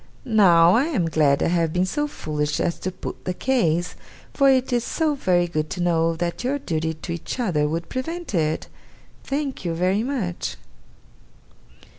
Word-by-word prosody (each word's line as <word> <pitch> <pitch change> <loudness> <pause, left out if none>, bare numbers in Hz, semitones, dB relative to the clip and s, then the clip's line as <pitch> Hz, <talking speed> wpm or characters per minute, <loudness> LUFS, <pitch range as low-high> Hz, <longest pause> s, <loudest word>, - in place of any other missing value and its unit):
Now, 180 -7 +6
I 250 +7 +4
am 265 - 0
glad 145 -3 +3
I - - +2
have 165 -2 +1
been 180 +2 +1
so 295 +11 -1
foolish 150 - -3
as 170 - -1
to 185 - -3
put 185 - -8
the 180 - -2
case, 175 -9 +1 0.4
for 275 -1 +4
it 260 -1 +2
is 240 -1 +2
so 315 +3 0
very 180 -10 +1
good 155 -2 -2
to 180 - -5
know 165 -1 +2
that 170 +6 -3
your 270 +3 0
duty 160 - -2
to 155 +2 -7
each 170 +9 -5
other 165 -11 +1
would 165 +2 -3
prevent 330 +4 -5
it! 155 -3 0 0.6
Thank 275 -3 -3
you 170 -2 -2
very 185 +4 +1
much. 230 -9 -3
180 Hz, 175 wpm, -23 LUFS, 165-255 Hz, 0.6 s, Now